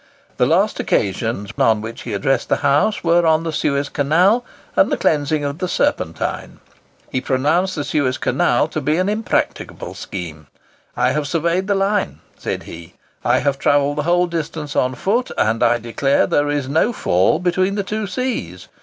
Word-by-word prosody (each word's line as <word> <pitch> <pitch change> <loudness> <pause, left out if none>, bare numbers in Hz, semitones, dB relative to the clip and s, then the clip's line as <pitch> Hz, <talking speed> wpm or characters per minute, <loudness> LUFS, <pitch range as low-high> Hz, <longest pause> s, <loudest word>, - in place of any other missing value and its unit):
The - - +3
last - - +2
occasions 100 +1 -1
on 110 -1 +4
which 110 +2 -7
he 115 - -5
addressed 135 +7 0
the - - +3
House 145 +10 +2
were 170 0 +3
on 160 0 +3
the 165 -1 -3
Suez 140 -1 0
Canal 180 - +2 0.3
and - - +4
the - - +1
cleansing 150 0 +1
of 140 +3 -4
the 185 - -1
Serpentine. - - -2 0.5
He 130 - -1
pronounced 155 +9 +1
the 145 - -2
Suez 140 -3 0
Canal - - +1
to - - -3
be 155 +2 +1
an 185 +1 +1
impracticable 215 +1 -2
scheme. 80 -5 -7 0.5
"I - - +2
have 150 -1 -1
surveyed 170 +4 0
the 200 - +2
line," 195 +1 0 0.2
said - - -4
he, 85 0 -11 0.3
"I - - +2
have 140 -1 0
travelled 145 +1 +2
the 155 +3 -1
whole 175 +1 +4
distance 160 -3 -4
on 130 0 +1
foot, 230 - 0
and 110 +2 +1
I 120 0 +4
declare 120 +4 +1
there 145 0 +1
is 145 -2 -1
no 160 - +2
fall 90 - +2
between 185 +2 0
the 200 - -1
two 215 +1 -3
seas. 180 - -4
150 Hz, 180 wpm, -19 LUFS, 130-180 Hz, 0.5 s, on